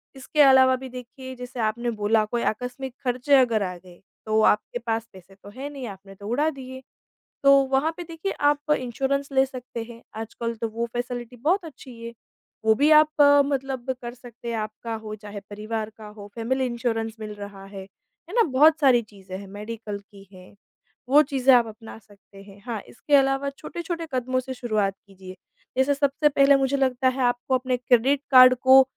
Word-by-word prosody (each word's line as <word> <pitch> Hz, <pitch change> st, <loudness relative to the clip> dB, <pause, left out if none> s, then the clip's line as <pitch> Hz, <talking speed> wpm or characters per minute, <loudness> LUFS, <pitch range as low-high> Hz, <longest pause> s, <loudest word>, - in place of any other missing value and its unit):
इसके 270 Hz, +3 st, 0 dB
अलावा 265 Hz, -2 st, +6 dB
भी 260 Hz, 0 st, -8 dB
देखिए 255 Hz, +1 st, -9 dB
जैसे 250 Hz, 0 st, -9 dB
आपने 235 Hz, +2 st, -1 dB
बोला 215 Hz, +1 st, +3 dB
कोई 235 Hz, +2 st, -3 dB
आकस्मिक 250 Hz, +3 st, -3 dB
खर्चे 255 Hz, +3 st, +2 dB
अगर 230 Hz, -5 st, +2 dB
आ 180 Hz, -1 st, -4 dB
गए, 175 Hz, 0 st, -17 dB, 0.2 s
तो 220 Hz, 0 st, +2 dB
आपके 215 Hz, +3 st, +2 dB
पास 230 Hz, -1 st, -3 dB
पैसे 190 Hz, +1 st, -16 dB
तो 200 Hz, +1 st, -14 dB
हैं 265 Hz, +7 st, -7 dB
नहीं, 275 Hz, -3 st, -7 dB
आपने 195 Hz, 0 st, -11 dB
तो 200 Hz, +1 st, -10 dB
उड़ा 285 Hz, +8 st, +1 dB
दिए। 260 Hz, -3 st, -9 dB, 0.6 s
तो 275 Hz, -, +7 dB, 0.2 s
वहाँ 270 Hz, +4 st, +2 dB
पे 350 Hz, -, -5 dB
देखिए 330 Hz, +3 st, -5 dB, 0.2 s
आप 295 Hz, +1 st, -4 dB
इंश्योरेंस 270 Hz, +3 st, -2 dB
ले 265 Hz, 0 st, +4 dB
सकते 250 Hz, -3 st, -7 dB
हैं, 230 Hz, 0 st, -12 dB
आजकल 225 Hz, +1 st, -4 dB
तो 230 Hz, -, 0 dB
वो 230 Hz, +2 st, -3 dB
फैसिलिटी 245 Hz, 0 st, -5 dB
बहुत 335 Hz, -, 0 dB
अच्छी 260 Hz, -6 st, -12 dB
है, 235 Hz, 0 st, -7 dB, 0.5 s
वो 220 Hz, -, +6 dB
भी 290 Hz, +6 st, +3 dB
आप 305 Hz, 0 st, +7 dB, 0.4 s
मतलब 265 Hz, -2 st, -2 dB
कर 240 Hz, 0 st, -6 dB
सकते 240 Hz, -1 st, -10 dB
हैं। 230 Hz, -, -2 dB
आपका 215 Hz, +1 st, -5 dB
हो 215 Hz, 0 st, -6 dB
चाहे 205 Hz, -1 st, -9 dB
परिवार 215 Hz, +1 st, -4 dB
का 215 Hz, -, -10 dB
हो, 210 Hz, -1 st, -11 dB
फैमिली 260 Hz, +3 st, -1 dB
इंश्योरेंस 225 Hz, -2 st, -2 dB
मिल 215 Hz, -1 st, -6 dB
रहा 200 Hz, -1 st, -9 dB
है। 195 Hz, 0 st, -9 dB
है 325 Hz, -, -19 dB
ना? 470 Hz, -, +5 dB
बहुत 310 Hz, +1 st, +4 dB
सारी 260 Hz, -5 st, +5 dB
चीज़ें 195 Hz, -4 st, -10 dB
हैं 200 Hz, 0 st, -10 dB
मेडिकल 210 Hz, +1 st, -7 dB
की 200 Hz, -1 st, -17 dB
हैं, 185 Hz, +1 st, -15 dB, 0.6 s
वो 290 Hz, +2 st, +7 dB
चीज़ें 270 Hz, -3 st, +3 dB
आप 240 Hz, -2 st, +3 dB
अपना 220 Hz, +1 st, -11 dB
सकते 200 Hz, -1 st, -18 dB
हैं। 200 Hz, 0 st, -16 dB
हाँ, 230 Hz, -4 st, -4 dB
इसके 290 Hz, +4 st, 0 dB
अलावा 270 Hz, 0 st, +2 dB
छोटे-छोटे 335 Hz, 0 st, -5 dB
कदमों 255 Hz, 0 st, 0 dB
से 260 Hz, +1 st, -6 dB
शुरुआत 215 Hz, -6 st, -1 dB
कीजिए, 190 Hz, -1 st, -12 dB, 0.4 s
जैसे 265 Hz, +2 st, +3 dB
सबसे 285 Hz, +1 st, +2 dB
पहले 280 Hz, 0 st, +5 dB
मुझे 270 Hz, +1 st, 0 dB
लगता 260 Hz, -1 st, +1 dB
है 260 Hz, +1 st, -3 dB
आपको 245 Hz, +2 st, +1 dB
अपने 255 Hz, 0 st, -1 dB
क्रेडिट 250 Hz, +3 st, +2 dB
कार्ड 255 Hz, -1 st, +9 dB
को 260 Hz, +1 st, +7 dB
245 Hz, 190 wpm, -24 LUFS, 215-270 Hz, 0.6 s, कार्ड